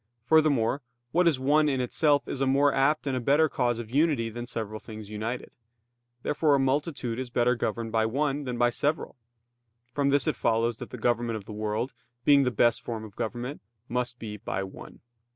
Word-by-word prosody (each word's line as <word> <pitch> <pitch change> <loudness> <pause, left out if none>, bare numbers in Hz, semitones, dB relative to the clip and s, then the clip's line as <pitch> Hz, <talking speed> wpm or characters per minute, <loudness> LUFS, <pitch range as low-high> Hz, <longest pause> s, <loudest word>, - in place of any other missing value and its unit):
Furthermore, 140 -3 +3 0.3
what 175 +1 +3
is 150 -6 +3
one 150 +3 +3
in 135 -2 0
itself 145 +3 +2
is 135 - -4
a 135 - +2
more 140 +2 +4
apt 150 +3 +2
and 135 -2 -1
a - - 0
better 145 +6 +4
cause 120 -5 0
of 115 -1 -7
unity 140 -5 +2
than 120 +2 -6
several 110 -2 -4
things 110 -2 -10
united. 110 +4 -4 0.7
Therefore 150 -1 +2
a - - +2
multitude 135 -3 -1
is 130 -1 -4
better 120 0 +2
governed 115 -1 -2
by 110 0 +2
one 140 +3 -1
than 125 -2 -3
by 120 0 +3
several. 150 +6 -1 0.8
From 140 0 +1
this 140 -2 +3
it - - 0
follows 115 0 +1
that - - -7
the - - -7
government 120 -1 0
of 100 - -10
the 110 - -8
world, 110 +4 -2 0.3
being 140 -1 +6
the 130 - +2
best 120 -1 +2
form 115 -2 -5
of 105 -3 -11
government, 120 +5 -4 0.3
must 125 0 -1
be 105 -3 -6
by 95 -1 -3
one. 95 - -11
125 Hz, 200 wpm, -27 LUFS, 115-140 Hz, 0.8 s, being